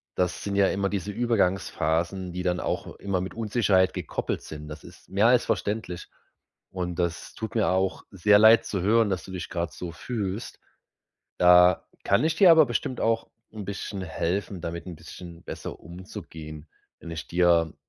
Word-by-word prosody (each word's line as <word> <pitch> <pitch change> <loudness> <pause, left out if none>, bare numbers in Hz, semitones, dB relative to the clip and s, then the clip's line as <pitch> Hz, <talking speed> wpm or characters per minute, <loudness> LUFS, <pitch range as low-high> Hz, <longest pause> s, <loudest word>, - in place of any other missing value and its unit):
das 90 -1 -1
sind 100 -1 -3
ja 100 -1 +4
immer 100 0 0
diese 100 0 -3
Übergangsphasen, 95 -5 0
die 90 - -3
dann 90 -1 0
auch - - -3
immer 95 -2 -2
mit 95 - -6
Unsicherheit 105 -5 +2
gekoppelt - - -3
sind. 75 -1 -9
Das 75 0 -9
ist - - -15
mehr 100 +4 +3
als 125 -1 +4
verständlich 100 -4 -2 0.6
und 90 -2 -4
das 85 -1 -3
tut 110 -2 -5
mir 110 - +2
auch 95 +1 0
sehr 105 +2 +4
leid 110 +1 +7
zu 95 -4 -2
hören, 110 +2 +3
dass 90 -3 -2
du 95 - -10
dich 90 -3 -5
grad 85 -1 -3
so 90 -2 -6
fühlst. 105 +3 -5 0.8
Da 90 0 +6 0.2
kann 100 +9 +3
ich 160 0 +2
dir 190 -3 +7
aber 160 -2 +8
bestimmt 125 +1 -2
auch 115 0 +1 0.2
'n 105 -2 -7
bisschen 100 0 -5
helfen, 90 +3 -2
damit 85 +1 -5
'n 85 -3 -7
bisschen 85 +1 -11
besser - - -7
umzugehen. 80 -4 -9 0.3
Wenn 85 - -9
ich 80 -1 -6
dir 85 -2 +3
95 Hz, 175 wpm, -26 LUFS, 85-105 Hz, 0.8 s, aber